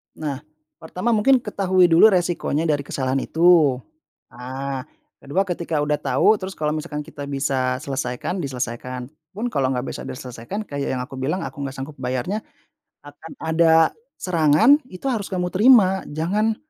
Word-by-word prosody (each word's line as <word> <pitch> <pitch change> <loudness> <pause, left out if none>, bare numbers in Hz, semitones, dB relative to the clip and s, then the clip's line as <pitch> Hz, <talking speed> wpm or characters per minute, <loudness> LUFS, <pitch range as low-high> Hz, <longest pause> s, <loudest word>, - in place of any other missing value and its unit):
Nah, 145 -4 -4 0.4
pertama 180 +8 -2
mungkin 245 +3 +3
ketahui 185 -4 +2
dulu 165 +6 +8
resikonya 175 -5 0
dari 150 -3 +1
kesalahan 130 0 -1
itu, 165 -5 +5 0.6
nah 130 +1 -5 0.4
ke-2 145 +8 0
ketika 170 -3 -2
udah 150 0 +1
tahu 140 +10 +3
terus 190 0 -6
kalau 150 -1 0
misalkan 150 -1 -5
kita 145 0 -9
bisa 135 -2 -1
selesaikan 135 +6 -3
diselesaikan. 125 0 -5 0.2
Pun 235 +4 -3
kalau 135 -7 +1
nggak 125 -1 -2
bisa - - -7
diselesaikan 125 - -6
kayak 140 -7 -3
yang 125 - -3
aku 130 +1 -9
bilang 155 +8 -2
aku - - -7
nggak 135 -1 -4
sanggup 140 +3 -7
bayarnya, 130 - -2 0.6
akan 145 +3 -12
ada 160 +1 +2 0.5
serangan 170 - +4
itu 185 - -12
harus 215 -5 -2
kamu 180 -1 -2
terima 200 -3 +5
jangan 200 +9 0
155 Hz, 150 wpm, -22 LUFS, 135-185 Hz, 0.6 s, dulu